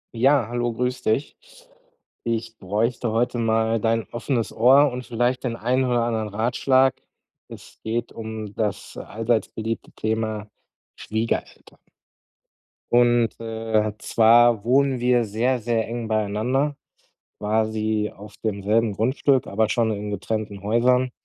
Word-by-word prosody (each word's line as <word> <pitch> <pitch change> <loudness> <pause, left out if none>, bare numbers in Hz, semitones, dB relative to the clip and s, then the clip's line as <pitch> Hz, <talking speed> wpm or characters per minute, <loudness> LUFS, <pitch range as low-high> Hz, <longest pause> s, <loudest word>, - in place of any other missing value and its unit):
Ja, 135 0 +4
hallo, 120 0 -1
grüß 125 +2 -2
dich. 120 +7 -1 0.9
Ich 115 -1 -3
bräuchte 110 +4 -1
heute 120 +2 0
mal 115 0 +1
dein 115 0 +1
offenes 120 0 -2
Ohr 135 +5 +5
und 125 0 -6
vielleicht 120 +2 0
den 120 -3 -2
einen 125 +3 0
oder 120 -2 +1
anderen 110 -2 -1
Ratschlag. 130 +5 +2 0.5
Es - - -13
geht 115 +1 -2
um 110 -2 -6
das 105 -2 -3
allseits 115 +1 -1
beliebte 115 +1 -5
Thema 110 -1 -2 0.5
Schwiegereltern. 110 +1 -4 1.1
Und, 120 -1 +3
äh, 110 -1 -1
zwar 115 0 +4
wohnen 135 +2 +2
wir 125 0 +3
sehr, 120 +5 0
sehr 115 -1 -1
eng 115 0 -4
beieinander, 110 +7 0 0.6
quasi 110 0 0
auf 105 +1 -12
demselben 105 +1 +1
Grundstück, 130 +4 +1
aber 110 +2 +1
schon 115 -1 +1
in 105 0 -4
getrennten 105 0 -4
Häusern. 125 +4 +2
115 Hz, 125 wpm, -23 LUFS, 110-120 Hz, 1.1 s, Ohr